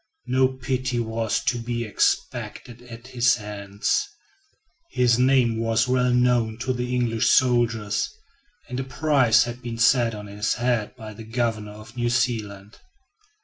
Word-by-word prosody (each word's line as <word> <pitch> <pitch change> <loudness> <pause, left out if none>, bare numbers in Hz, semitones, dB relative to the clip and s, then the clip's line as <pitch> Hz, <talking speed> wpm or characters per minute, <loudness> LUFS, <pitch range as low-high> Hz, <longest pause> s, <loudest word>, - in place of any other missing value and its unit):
No 130 +1 +3
pity 130 -1 -2
was 115 -1 -1
to 120 - 0
be 120 0 -3
expected 115 +2 -2
at 120 -1 -12
his 120 -1 +3
hands. 100 - -2 0.8
His 125 -1 +2
name 125 -3 +3
was 115 +1 +1
well 125 0 +2
known 120 -3 +2
to 130 0 -1
the 125 0 -3
English 115 -2 +1
soldiers, 115 -5 +2 0.6
and 125 -1 -4
a - - -2
price 130 -5 +3
had 120 +1 -7
been 120 -2 -6
set 115 -1 +3
on 105 0 -8
his 105 +1 -2
head 120 -3 -1
by 110 -3 -9
the 110 +2 -10
governor 110 -2 -2
of 110 +2 -13
New 120 -1 0
Zealand. 110 -5 -2
120 Hz, 145 wpm, -24 LUFS, 110-125 Hz, 0.8 s, No